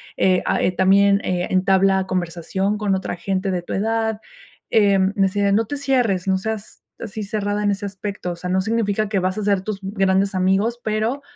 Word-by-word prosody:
Eh, 185 -1 +2
a, - - +1
eh, - - +2
también, 195 +2 +4
eh, 180 -1 -1
entabla 190 0 +3
conversación 185 +3 -2
con 205 -2 0
otra 190 - -3
gente 190 +2 -2
de 180 -2 -2
tu - - -6
edad", 220 +1 -1 0.5
eh, 200 -3 +4 0.2
decía: 200 0 +1
"No 220 +3 +2
te 290 +7 -4
cierres, 245 -10 0
no 190 0 +2
seas 220 +1 -6 0.2
así 215 +1 -6
cerrada 205 0 -2
en 205 - +2
ese 200 +1 -3
aspecto, 195 -2 -5
o - - -5
sea, 180 +1 -5
no 190 +1 +2
significa 215 0 0
que 200 -2 +1
vas 185 +2 -1
a - - -2
hacer 200 -2 +1
tus 200 0 -4
grandes 195 0 +1
amigos, 195 +6 +1
pero, 220 +5 -1
195 Hz, 195 wpm, -21 LUFS, 190-215 Hz, 0.5 s, también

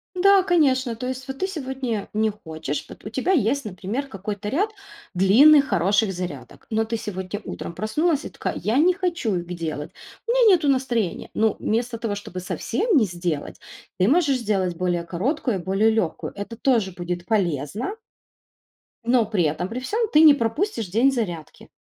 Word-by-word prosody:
Да, 390 +1 +5
конечно. 270 -9 +2
То 250 +3 -5
есть 260 0 -5
вот 270 0 -5
ты 380 - 0
сегодня 265 - -4
не 215 +1 +2
хочешь, 160 -7 -5
пот - - -14
у - - -4
тебя 265 - -1
есть, 280 - +2
например, 210 +8 -4
какой-то 205 -2 -5
ряд 385 - +1 0.4
длинных 265 +11 +6
хороших 195 +4 +2
зарядок, 165 -9 -7
но 220 0 +1
ты 225 +1 -3
сегодня 190 -1 -5
утром - - -6
проснулась 290 - 0
и - - -5
такая: - - -4
"Я 220 +4 0
не 350 +5 +5
хочу 345 - -1
их 175 -1 -3
делать, 155 -3 -5 0.4
у 470 - +1
меня 470 -6 +6
нету 310 -4 -1
настроения". 245 -9 0
Ну, 220 -1 +2
вместо 235 +2 -1
того, 220 -2 -3
чтобы 190 -3 -7
совсем 400 - 0
не 225 - +4
сделать, 175 -4 -4 0.4
ты 185 - +3
можешь 290 -3 +3
сделать 195 -6 0
более 175 -1 -1
короткую 200 - -1
и - - -9
более 195 +4 +2
легкую. 220 -7 -1
Это 205 +3 -7
тоже 230 -7 +1
будет 175 0 -5
полезно 195 - -1 1.1
Но 240 -1 +3
при 205 -5 0
этом 155 +4 -1
при 230 +4 -5
всём 435 - -1
ты 305 - +6
не 310 -2 +9
пропустишь 230 - -1
день 235 +9 +3
зарядки. 175 - -5
220 Hz, 175 wpm, -23 LUFS, 185-275 Hz, 1.1 s, не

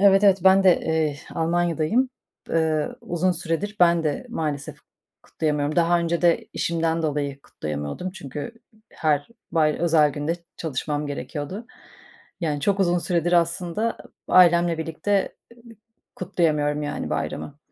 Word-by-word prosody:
Evet, 200 0 +6
evet, 195 -1 +5
ben 190 0 +6
de, 180 - +5
eee, 160 -2 0 0.2
Almanya'dayım. 170 +8 +1 0.4
Eee, 160 -2 +1
uzun 175 +2 0
süredir 175 +5 -3
ben 170 -1 +5
de 155 - -2
maalesef 150 - -4 0.4
kutlayamıyorum. 150 -1 -1
Daha 175 0 +4
önce 170 0 -1
de 170 -1 +3
işimden 165 -1 0
dolayı 145 -2 -2
kutlayamıyordum 75 - -5
çünkü 145 - -7 0.4
her 150 0 0 0.2
bay 155 -3 +3
özel 160 -3 +4
günde 145 +3 -2 0.2
çalışmam 150 -1 -3
gerekiyordu. 150 +9 -5 0.7
Yani, 150 -4 -1
çok 195 +6 +1
uzun 175 -1 +3
süredir 175 -1 0
aslında 175 +5 +1 0.3
ı - - -5
ailemle 175 -2 +5
birlikte 165 +5 -1 0.2
ı - - -19 0.6
kutlayamıyorum, 150 -5 0
yani, 145 - -4
bayramı 145 0 -4
165 Hz, 130 wpm, -24 LUFS, 150-175 Hz, 0.7 s, Evet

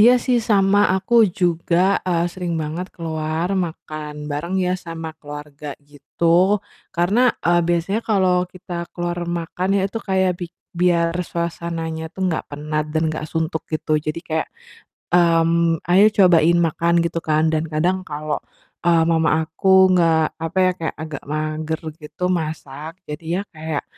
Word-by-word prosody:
Iya 245 +4 +7
sih 245 -2 +2
sama, 205 -2 +3
aku 220 +2 +4
juga, 175 +2 +1
eee, 170 -2 0
sering 175 -3 -3
banget 160 +4 -3
keluar 160 +2 -2
makan 155 -4 -4
bareng 150 +6 -3
ya 180 -1 +1
sama 165 -3 -5
keluarga 145 0 -8
gitu. 145 +3 -8 0.7
Karena, 210 +9 +3 0.2
eee, 175 +1 +4
biasanya 175 +5 0
kalau 185 -3 +2
kita 175 -1 -7
keluar 175 0 -3
makan 175 +2 -3
ya 195 - +1
itu 225 +3 -3
kayak 190 -3 +1
bik 175 -1 -6 0.2
biar 170 -1 +2 0.2
suasananya 165 -1 -3
tuh 190 +3 -4
nggak 175 -3 -1
penat 150 +1 -3
dan 160 +1 -1
nggak 155 0 -5
suntuk 160 0 -2
gitu. 155 -1 0
Jadi 155 +2 -4
kayak, 160 -1 -2 0.6
mmm, 165 -1 +3
"Ayo 185 +4 +5
cobain 175 -3 +5
makan." 170 +2 0
Gitu 170 0 -1
kan, 155 0 +1
dan 160 0 0
kadang 165 +4 +1
kalau, 150 0 -3 0.5
eee, 165 -1 +5
mama 160 -1 +2
aku 190 +4 +4
nggak, 160 -2 +2
apa 165 +3 -4
ya 185 - +4
kayak 160 - -3
agak 155 -2 -7
mager 155 +1 -2 0.2
gitu 155 +2 -9
masak, 155 -2 -4
jadi 150 +1 -7
ya 195 - 0
kayak, 160 -2 -4
165 Hz, 150 wpm, -21 LUFS, 155-180 Hz, 0.7 s, Iya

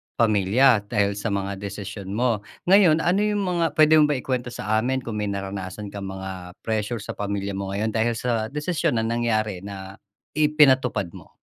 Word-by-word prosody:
pamilya, 110 +3 +4
dahil 100 -3 +1
sa 110 - -3
mga 100 -2 -2
desisyon 100 -1 -6
mo. 120 -3 +1 0.3
Ngayon, 175 -5 +6
ano 180 +3 +2
'yong 210 -1 +1
mga 175 -2 0
puwede 155 0 +6
mo 150 - +5
ba 145 - +1
ikwento 125 -1 -2
sa 110 -2 -1
amin 130 +2 -1
kung 110 -2 -4
may 105 - -1
naranasan 100 0 -5
kang 100 -1 -6
mga 95 -1 -7
pressure 110 0 -2
sa - - -5
pamilya 100 -1 -3
mo 95 0 -4
ngayon, 110 +2 -1
dahil 115 +1 0
sa 115 -2 -1
desisyon 150 0 -1
na 110 - +1
nangyari 110 -4 0
na 95 0 -9 0.3
ipinatupad 140 - +3
mo? - - -14
110 Hz, 180 wpm, -24 LUFS, 100-130 Hz, 0.3 s, Ngayon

